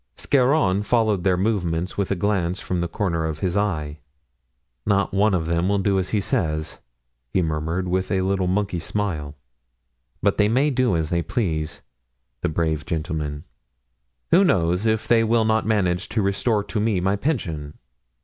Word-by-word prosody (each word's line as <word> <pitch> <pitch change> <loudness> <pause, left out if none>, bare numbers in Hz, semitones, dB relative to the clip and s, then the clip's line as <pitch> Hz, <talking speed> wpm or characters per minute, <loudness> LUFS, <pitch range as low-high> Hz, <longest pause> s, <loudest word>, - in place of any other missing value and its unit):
Scarron 130 -7 +2
followed 110 -4 +1
their 95 -2 +2
movements 90 -4 -1
with 100 -2 -1
a 100 - +1
glance 95 -1 0
from 90 -2 -2
the 85 - -1
corner 85 -2 -1
of 80 -2 -2
his 90 +2 -2
eye. 80 -8 -1 0.8
"Not 100 -1 +1
one 100 0 +3
of 80 -3 -1
them 85 +3 0
will 100 - +2
do 95 0 +1
as 95 - -2
he 105 - +1
says," 80 -5 -1 0.5
he 90 +8 +1
murmured, 80 +3 -2
with 95 +1 -1
his 95 -2 +1
little 95 -1 0
monkey 95 -1 0
smile; 80 -6 -3 0.8
"but - - +1
they 105 0 +4
may 135 +6 +2
do 125 -6 +2
as 80 -2 -1
they 85 -1 +1
please, 80 - -2 0.6
the - - 0
brave 80 -1 -1
gentlemen! 75 -3 -3 0.9
Who 185 +4 +6
knows 90 - +2
if 110 0 0
they 115 -1 +4
will 115 0 +2
not 110 0 +1
manage 95 -4 +1
to 110 - 0
restore 105 +2 +1
to 105 - -3
me 105 -3 +1
my 95 +3 +1
pension? 85 - -3
95 Hz, 170 wpm, -23 LUFS, 85-105 Hz, 0.9 s, Who